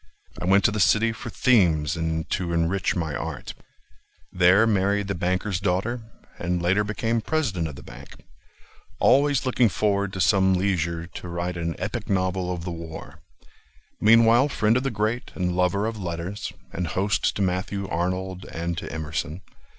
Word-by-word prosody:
I - - -2
went 95 +2 +4
to 105 - +4
the 105 - -2
city 110 +3 +4
for 110 - -7
themes 80 - +3
and 80 -1 -2
to 85 -2 -1
enrich 85 +3 0
my 80 -4 -2
art; - - -5 0.8
There 90 +4 +5
married 100 -1 +1
the - - 0
banker's 90 +2 -1
daughter, 100 +6 -1 0.4
And 90 0 -1
later 90 +4 +2
became 115 +2 -1
president 110 - -1
of 75 - -8
the - - -11
bank— 70 +3 -12 0.8
Always 140 -2 +3
looking 125 -2 +3
forward 100 -1 0
to 95 - -5
some 95 +2 +4
leisure 85 -3 -1
To 90 +1 -9
write 85 +1 -3
an 85 -1 -3
epic 110 +2 -4
novel 95 -1 0
of 85 -2 -4
the 90 - -4
war. 80 -1 -8 0.8
Meanwhile 115 +5 +5
friend 110 -4 +2
of 125 - +2
the 135 - -1
great, 110 +1 -2
and 90 -1 -1
lover 90 +3 +1
of 110 -2 -4
letters, 85 +3 -4 0.2
And 90 0 -2
host 95 +6 0
to 100 - 0
Matthew 95 +2 -2
Arnold 95 +2 -2
and 85 +1 -3
to - - -7
Emerson. 80 +2 -4
95 Hz, 165 wpm, -24 LUFS, 85-105 Hz, 0.8 s, There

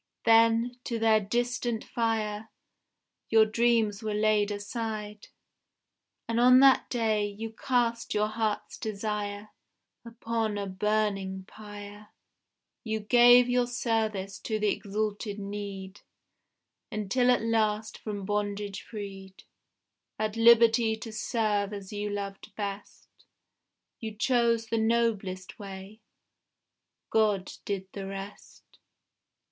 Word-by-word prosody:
Then, 230 +2 +4
to 235 - -2
their 220 -1 +4
distant 240 +2 -1
fire, 220 -2 -2 0.8
Your 220 -1 +6
dreams 220 -2 +1
were 215 -1 -2
laid 210 -1 +2
aside; 210 0 -5 1.0
And 230 0 0
on 250 +1 +7
that 270 -1 +5
day, 220 -4 +1
you 215 +2 -6
cast 235 -1 -1
your 210 0 +3
heart's 215 -1 -3
desire 210 -1 -4 0.5
Upon 230 -2 -3
a 200 - -2
burning 195 -1 -1
pyre; 205 0 -11 0.8
You 220 -1 -2
gave 245 +3 +6
your 245 0 +2
service 220 -5 -2
to 220 - -2
the 210 -1 +1
exalted 205 +1 -3
need, 200 -1 -6 0.9
Until 225 +4 +1
at 245 -2 +3
last 220 -1 0
from 205 -3 -5
bondage 205 -1 -2
freed, 195 -3 -9 0.7
At 215 0 -2
liberty 230 -1 +5
to 220 +1 -8
serve 210 -2 -1
as 200 0 -8
you 205 0 -3
loved 200 -1 -6
best, 200 -1 -6 0.9
You 220 -2 -6
chose 235 0 +2
the 225 0 -1
noblest 220 -5 -1
way. 200 +2 -9 1.1
God 210 -4 +2
did 195 -2 -3
the 195 -1 -6
rest. 195 +1 -10
215 Hz, 110 wpm, -28 LUFS, 205-230 Hz, 1.1 s, on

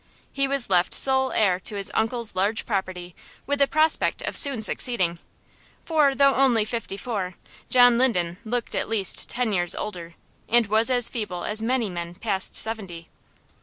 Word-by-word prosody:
He 275 0 0
was 275 -2 -1
left 180 -1 +2
sole 265 -1 +3
heir 190 -4 +2
to 205 - -4
his 200 -1 -2
uncle's 225 0 -1
large 200 +4 0
property 185 -4 -4 0.3
with 285 0 -2
the 280 - +4
prospect 310 +2 +1
of - - -4
soon 270 -7 +2
succeeding, 185 -8 0 0.7
for 300 -4 +2
though 275 0 +4
only 250 -5 +2
fifty 230 -3 -5
four, 200 -6 -4 0.3
John 245 -1 +5
Linden 180 -9 0
looked 235 +1 -4
at - - -3
least 210 -4 -1
ten 240 -3 -1
years 175 -2 +1
older, 170 -5 -7 0.3
and 235 0 +4
was 220 +4 +3
as 245 -2 +2
feeble 205 -7 -5
as 215 +1 -3
many 240 0 0
men 175 -2 -6
past 195 -2 0
seventy. 195 -7 -3
220 Hz, 165 wpm, -24 LUFS, 185-250 Hz, 0.7 s, John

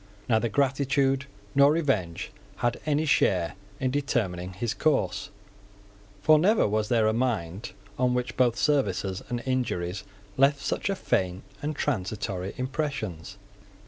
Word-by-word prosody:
Neither 115 0 +2
gratitude 135 +1 +1 0.3
nor 140 +1 +6
revenge 105 - 0 0.2
had 120 -1 -1
any 150 +1 +2
share 90 - +2 0.3
in 130 -1 0
determining 95 -10 -1
his 110 +4 -2
course; 155 -3 0 0.9
for 155 +4 +6
never 205 - +4
was 105 +1 0
there 115 -3 +3
a 110 - +3
mind 110 -6 -2 0.3
on 125 -1 +2
which 125 0 -2
both 120 -2 +3
services 100 -10 +1
and 120 -1 -3
injuries 105 -9 -1 0.3
left 140 +2 +5
such - - -2
faint 95 - 0 0.2
and 150 +1 -2
transitory 100 -7 -2
impressions. 130 - -3
120 Hz, 125 wpm, -27 LUFS, 95-140 Hz, 0.9 s, nor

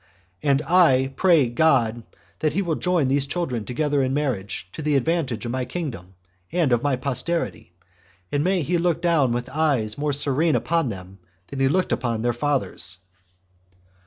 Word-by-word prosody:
And 140 0 +2
I 135 -7 +4
pray 170 -8 +4
God 120 -3 +2 0.4
that 155 -2 0
he 200 +4 0
will 170 -3 -1
join 175 -3 +1
these 140 +1 +1
children 135 -9 -2
together 145 +2 0
in 130 0 0
marriage, 110 -11 -2
to - - -6
the 150 -1 +1
advantage 135 -5 0
of 120 - -3
my 130 0 -1
kingdom, 120 - -6 0.4
and 165 -5 +1
of 120 -1 +3
my 145 -1 +1
posterity; 130 - -3 0.6
and 145 0 +1
may 185 -1 +1
he 175 +4 0
look 170 -2 +1
down 165 -7 +2
with 120 +1 -2
eyes 135 -7 0
more 150 0 0
serene 145 +3 +1
upon 165 -5 +1
them 95 -1 -9 0.3
than 135 - -6
he 135 - +3
looked 185 +7 +1
upon 115 -3 -1
their 120 0 +1
fathers." 120 -7 -2
140 Hz, 170 wpm, -23 LUFS, 120-160 Hz, 0.6 s, I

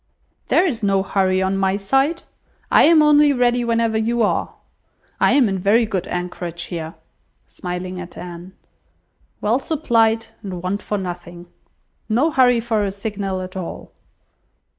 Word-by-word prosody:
"There 370 - +3
is 250 -11 -2
no 195 -2 +2
hurry 190 -1 +1
on 190 +1 0
my 190 0 +1
side. 270 +11 0 0.5
I - - +6
am 315 -1 +6
only 295 -1 +5
ready 245 -1 +2
whenever 230 -1 +1
you 230 +1 +1
are. 205 - -1 0.6
I - - +4
am 270 -5 +4
in 195 -2 -2
very 215 +5 +3
good 190 -4 -3
anchorage 175 -1 -4
here," 165 -2 -6 0.5
(smiling 180 0 -6
at 180 -1 -9
Anne,) 175 +1 -9 0.9
"well 225 +5 +1
supplied, 230 -7 +1 0.2
and 185 -4 -7
want 195 +3 -2
for 210 - -3
nothing. 175 -2 -7 0.6
No 260 +9 +2
hurry 250 -3 +4
for 225 -2 0
a 200 - -1
signal 195 -2 -4
at 185 0 -8
all. 185 -3 -7
200 Hz, 150 wpm, -20 LUFS, 185-240 Hz, 0.9 s, I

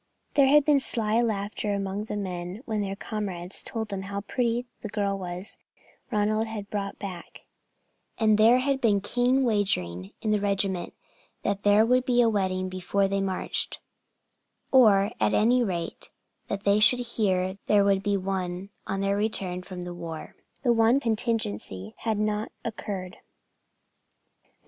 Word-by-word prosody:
There 280 -2 +5
had 295 +1 +5
been 295 -2 +4
sly 225 -3 +1
laughter 205 -2 -1
among 200 +1 -3
the 215 - -5
men 185 +1 -5
when 215 -2 -1
their 195 -1 -3
comrades 195 -4 -5
told 220 -2 -4
them 195 -2 -4
how 200 +1 -4
pretty 235 +2 0
was 245 +1 -3 0.2
the 215 - -5
girl 200 -2 -1 0.9
Ronald 215 0 +1
had 210 -2 -7
brought 200 -1 -3
back; 185 -4 -8 0.8
and 215 -1 +4
there 230 +3 +7
had 270 +1 0
been 205 -4 +3
keen 245 +5 +2
wagering 100 - 0
in 215 - +1
the 210 -1 +2
regiment 195 -3 +1 0.5
that 200 0 -1
there 205 +2 +5
would 250 +2 +3
be 245 -1 +1
a 235 -1 +5
wedding 185 -2 0
before 185 +2 0
they 195 0 -1
marched, 190 -1 -1 0.9
or 210 -6 +5
at 105 -1 +2
any 245 +3 +4
rate 175 -6 -3 0.4
that 200 0 -4
they 200 +1 +4
should 245 +3 +6
hear 190 -2 0
there 205 -1 +4
would 195 -1 +3
be 200 0 +1
one 190 0 -3 0.2
on 195 0 -2
their 195 0 +1
return 195 -4 0
from 180 -1 -8
the 175 0 -6
war. 165 -2 -7 0.3
The 240 -3 +4
one 230 +3 +4
contingency 215 - -2
had 220 -2 -1
not 210 +1 -1
occurred. 195 -5 -5
205 Hz, 155 wpm, -26 LUFS, 190-225 Hz, 0.9 s, there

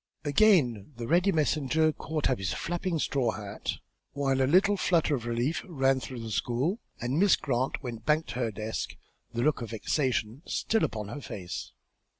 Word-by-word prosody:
Again 145 - +3
the 120 - -4
ready 180 +7 +4
messenger 155 -1 +2
caught 155 0 -2
up 130 - 0
his 95 -3 -1
flapping 175 0 -2
straw 130 -6 0
hat, 105 -1 -4 0.4
while 135 -2 +1
a 130 - +3
little 195 +5 +5
flutter 170 -5 +2
of 120 -4 -2
relief 120 +7 0
ran 135 -4 +2
through 130 -2 -6
the 115 -1 -6
school, 130 - 0 0.2
and 125 +6 -1
Miss 200 0 +6
Grant 130 +1 -1
went 115 -3 -6
back 155 +4 +2
to 125 - -5
her 115 -3 0
desk, 110 +1 -4 0.4
the 120 +1 -1
look 150 -3 +2
of 115 - -5
vexation 120 +1 -1
still 225 -1 +1
upon 105 -2 -2
her 145 +6 -6
face. 90 - -6
135 Hz, 175 wpm, -29 LUFS, 115-155 Hz, 0.4 s, Miss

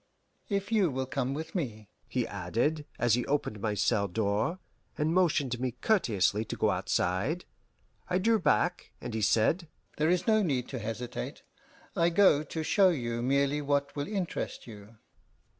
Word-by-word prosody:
If 200 0 -2
you 205 -6 +3
will 130 -1 -2
come 130 +1 -2
with 160 +2 -6
me," 110 - -4 0.2
he 125 -2 -1
added, 115 - -1
as 120 -2 +2
he 120 +1 +2
opened 140 -7 -1
my 105 -1 -1
cell 100 -1 +1
door, 105 - 0 0.4
and 155 +2 +1
motioned 150 -9 +2
me 125 -1 -2
courteously 110 - +1
to - - -5
go - - +2
outside. 100 - -1 0.6
I 180 - +2
drew 225 +4 +3
back, 175 -1 +1
and 120 -2 -6
he 110 - -2
said, 135 - +2 0.3
"There 155 +1 +2
is 180 0 +2
no 220 -1 +4
need 135 -10 0
to 130 - -4
hesitate; 115 - -5 0.5
I 170 0 +3
go 175 -4 +5
to 160 +1 -4
show 190 +4 +4
you 120 -8 -2
merely 140 +3 +1
what 140 0 0
will 145 -1 -3
interest 195 -4 -3
you." 105 -1 -12
140 Hz, 165 wpm, -30 LUFS, 115-170 Hz, 0.6 s, go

